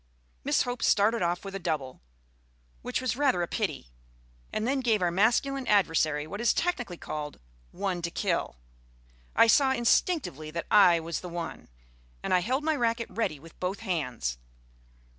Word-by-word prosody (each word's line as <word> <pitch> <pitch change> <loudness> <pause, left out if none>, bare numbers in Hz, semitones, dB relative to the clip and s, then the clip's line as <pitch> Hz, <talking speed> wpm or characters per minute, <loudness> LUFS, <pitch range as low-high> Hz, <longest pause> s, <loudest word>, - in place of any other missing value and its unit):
Miss - - +2
Hope 245 -1 -4
started 220 +2 +3
off 175 +2 -1
with 195 - -6
a 195 - -4
double, 155 -7 -3 0.8
which - - -2
was 255 -2 -1
rather 265 -10 +2
a - - -2
pity, - - -3 0.6
and 215 +2 -2
then 270 +1 +1
gave 230 -4 +2
our 175 -2 +1
masculine 245 +8 +1
adversary 160 -7 +2
what 200 +8 -6
is 235 - +3
technically 245 - -1
called 150 -2 -6 0.3
"one 185 - -3
to 170 - -2
kill." 170 - -1 0.8
I - - +7
saw 265 +4 +4
instinctively 240 - +1
that 170 +2 -4
I 175 -5 +7
was 165 0 -4
the 180 - -8
one, 170 -1 -6 0.5
and - - 0
I 180 - +5
held 255 +10 -1
my 315 0 +1
racquet 230 -3 -1
ready 180 -10 -2
with 165 +3 -16
both 185 +3 -3
hands. 125 - -2
195 Hz, 165 wpm, -28 LUFS, 165-235 Hz, 0.8 s, I